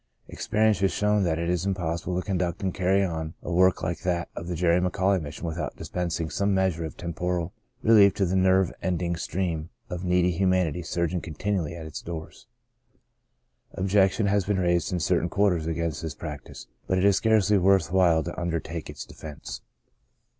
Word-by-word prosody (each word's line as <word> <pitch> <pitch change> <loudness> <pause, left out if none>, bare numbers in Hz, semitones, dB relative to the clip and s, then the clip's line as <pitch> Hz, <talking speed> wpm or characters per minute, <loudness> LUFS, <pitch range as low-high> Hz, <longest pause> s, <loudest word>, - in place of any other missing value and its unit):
Experience 110 -2 +1
has 95 -1 +2
shown 105 0 +2
that 80 -2 +1
it 85 0 -2
is 90 -1 0
impossible 90 -2 -2
to - - -6
conduct 90 -1 -1
and 95 -2 0
carry 95 +2 +2
on 80 -3 -3
a - - -5
work 95 +1 +3
like 80 0 -2
that 85 -2 -1
of 85 - -6
the 90 - -3
McAuley 90 +3 +2
Mission 75 +3 -7
without 80 -2 -3
dispensing 85 -2 -3
some 100 +4 0
measure 95 -3 +1
of 80 - -8
temporal 85 +1 -3 0.3
relief 105 -3 +6
to 100 - +1
the 90 +1 -1
never 95 -1 +3
ending 85 -1 -1
stream 85 -2 -3 0.2
of 90 0 -4
needy 90 0 +2
humanity 90 -2 +1
surging 85 +1 -1
continually 85 0 -2
at 80 -2 -7
its 80 -1 -7
doors. 80 -1 -8 1.3
Objection 95 +2 +2
has 100 0 +2
been 100 +1 0
raised 85 -2 +1
in 90 - 0
certain 85 +2 +1
quarters 90 -5 +1
against 85 0 -2
this 80 -4 -5
prac 75 -4 -7
tice, - - -11 0.2
but 95 - +1
it 95 - +2
is 100 -1 +5
scarcely 105 -3 +3
worth 95 -2 +3
while 85 -4 +4
to 85 - -5
under 85 -1 0
take 80 0 -7
its - - -7
defense. 75 -2 -9
90 Hz, 180 wpm, -26 LUFS, 85-95 Hz, 1.3 s, relief